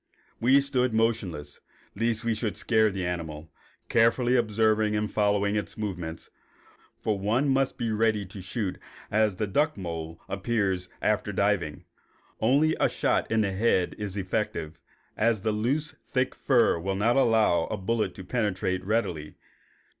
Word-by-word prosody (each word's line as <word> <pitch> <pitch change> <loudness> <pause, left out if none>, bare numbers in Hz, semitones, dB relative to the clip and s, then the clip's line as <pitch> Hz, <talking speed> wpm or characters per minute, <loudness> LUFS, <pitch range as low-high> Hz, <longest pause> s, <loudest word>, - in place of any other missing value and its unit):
We 130 +4 +5
stood 130 -4 0
motionless, 100 -11 -1 0.4
lest 115 +1 0
we 115 - +2
should 110 -1 -3
scare 110 -2 +3
the 95 -2 -3
animal, 80 -3 -5 0.4
carefully 120 +2 +3
observing 110 -2 +2
and 105 -1 -1
following 100 -1 +1
its 105 -5 -3
movements, 90 -6 -5 0.7
for 105 -2 -1
one 115 +8 +1
must 135 -1 +1
be 115 -1 -1
ready 110 -1 +1
to 95 +1 -9
shoot 100 0 -3
just - - -36 0.3
as 110 -2 +2
the 105 - -1
duck 150 +9 +1
mole 85 -3 -5
reappears 100 -3 -1
after - - +1
diving. - - 0 0.5
Only 145 +7 +3
a - - +3
shot - - 0
in 110 -1 +3
the 100 -2 0
head 95 -2 +1
is 105 -1 -4
effective, 90 -5 -3 0.4
as 110 -2 +1
the 110 - +1
loose, 135 +9 0 0.2
thick 130 -1 0
fur 120 -10 +3
will 95 +3 -2
not 110 +5 +2
allow 110 -10 +3
a 110 - -4
bullet 110 +3 -1
to 95 - -8
penetrate 95 -4 -1
it - - -13
readily. 100 -9 -1
105 Hz, 155 wpm, -27 LUFS, 95-115 Hz, 0.7 s, We